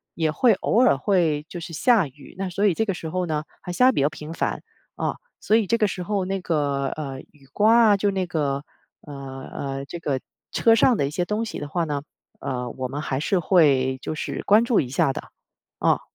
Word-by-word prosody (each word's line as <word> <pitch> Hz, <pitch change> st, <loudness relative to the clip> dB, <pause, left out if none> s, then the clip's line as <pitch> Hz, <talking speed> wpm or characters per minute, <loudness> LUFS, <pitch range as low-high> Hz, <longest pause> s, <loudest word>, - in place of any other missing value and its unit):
也 160 Hz, -2 st, +1 dB
会 240 Hz, +9 st, +4 dB
偶 235 Hz, -, +2 dB
尔 140 Hz, -, +4 dB
会 160 Hz, -4 st, +1 dB
就 175 Hz, -1 st, -7 dB
是 165 Hz, -, -7 dB
下 215 Hz, -, +3 dB
雨。 140 Hz, +2 st, -16 dB
那 195 Hz, -1 st, -3 dB
所 195 Hz, +4 st, 0 dB
以 195 Hz, -, +4 dB
这 225 Hz, -, 0 dB
个 200 Hz, -3 st, -1 dB
时 165 Hz, -2 st, -6 dB
候 185 Hz, +2 st, -1 dB
呢 155 Hz, -2 st, -2 dB, 0.2 s
还 180 Hz, -, -6 dB
下 250 Hz, +8 st, +3 dB
得 260 Hz, -, +5 dB
比 -, -, +1 dB
较 145 Hz, -, +3 dB
频 155 Hz, +1 st, -8 dB
繁 -, -, -2 dB, 0.3 s
啊， -, -, -2 dB, 0.2 s
所 215 Hz, -, +2 dB
以 225 Hz, -, +3 dB
这 230 Hz, +4 st, +1 dB
个 215 Hz, -3 st, +3 dB
时 180 Hz, -1 st, -4 dB
候 195 Hz, 0 st, -1 dB
那 195 Hz, 0 st, -2 dB
个， 145 Hz, -5 st, 0 dB
呃， 135 Hz, -3 st, -5 dB
雨 140 Hz, -3 st, -22 dB
刮 225 Hz, +1 st, +5 dB
啊， 200 Hz, -, +4 dB
就 200 Hz, +1 st, +1 dB
那 190 Hz, -1 st, -1 dB
个 145 Hz, -5 st, -1 dB, 0.5 s
呃 145 Hz, -, -8 dB, 0.4 s
呃， 135 Hz, 0 st, -4 dB
这 170 Hz, -, -7 dB
个 140 Hz, -5 st, -1 dB, 0.3 s
车 225 Hz, -1 st, +4 dB
上 230 Hz, 0 st, +4 dB
的 140 Hz, -, +1 dB
一 -, -, -3 dB
些 175 Hz, +4 st, -1 dB
东 210 Hz, +4 st, -2 dB
西 -, -, -6 dB
的 145 Hz, -, -6 dB
话 170 Hz, +1 st, 0 dB
呢， 145 Hz, -2 st, -2 dB, 0.4 s
呃， 125 Hz, -2 st, -3 dB
我 130 Hz, -1 st, -4 dB
们 145 Hz, +3 st, -4 dB
还 135 Hz, -3 st, -2 dB
是 190 Hz, +3 st, +1 dB
会 140 Hz, -7 st, +3 dB
就 -, -, -4 dB
是 155 Hz, -, -4 dB
关 215 Hz, +3 st, +5 dB
注 235 Hz, -3 st, +3 dB
一 125 Hz, -, -5 dB
下 135 Hz, +1 st, +1 dB
的， -, -, -5 dB, 0.6 s
啊。 -, -, +2 dB
165 Hz, 255 characters per minute, -24 LUFS, 140-200 Hz, 0.6 s, 得